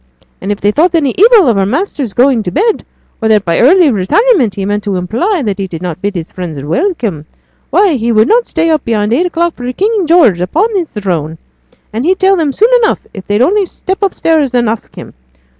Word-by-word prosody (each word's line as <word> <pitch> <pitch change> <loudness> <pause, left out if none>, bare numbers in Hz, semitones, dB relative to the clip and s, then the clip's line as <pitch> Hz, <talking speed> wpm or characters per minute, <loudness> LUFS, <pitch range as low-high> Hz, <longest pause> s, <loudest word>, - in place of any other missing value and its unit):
And 195 - -3
if 205 - -3
they 205 - +1
thought 335 +9 +1
any 290 -5 +1
evil 430 - +5
of 230 -4 +2
her 195 - +1
master's 275 - -3
going 250 -2 +2
to 180 - -4
bed, 425 - 0 0.4
or 220 - 0
that 215 -2 +2
by 170 -1 0
that - - +3
early 320 +4 +5
retirement 250 - +1
he 195 - -4
meant 205 +1 -2
to 200 -2 -2
imply 245 - -1
that 205 -1 -3
he 195 - -3
did 170 -1 -8
not 175 -1 -5
bid 205 0 -3
his 170 -2 -6
friends 175 -5 -6
welcome, 210 - -2 0.4
why 400 -5 +3
he 235 -3 -1
would 220 +1 +3
not 475 +1 +2
stay 330 0 0
up 310 - 0
beyond 215 -1 -1
eight 350 +9 +1
o'clock 340 -1 -1
for 245 0 -5
King 400 - -1
George 300 - +4
upon 380 - 0
his 350 -5 -1
throne, 170 -6 -3 0.6
as 225 +3 -2
he'd 370 +4 +1
tell 385 +1 +3
them 320 -5 0
soon 440 - +2
enough, - - 0
if 195 -2 -10
they'd 205 +4 +1
only 390 +6 +1
step 380 +3 -5
upstairs 320 -8 +1
and 240 -1 +1
ask 220 0 -4
him. - - -10
250 Hz, 225 wpm, -12 LUFS, -, 0.6 s, evil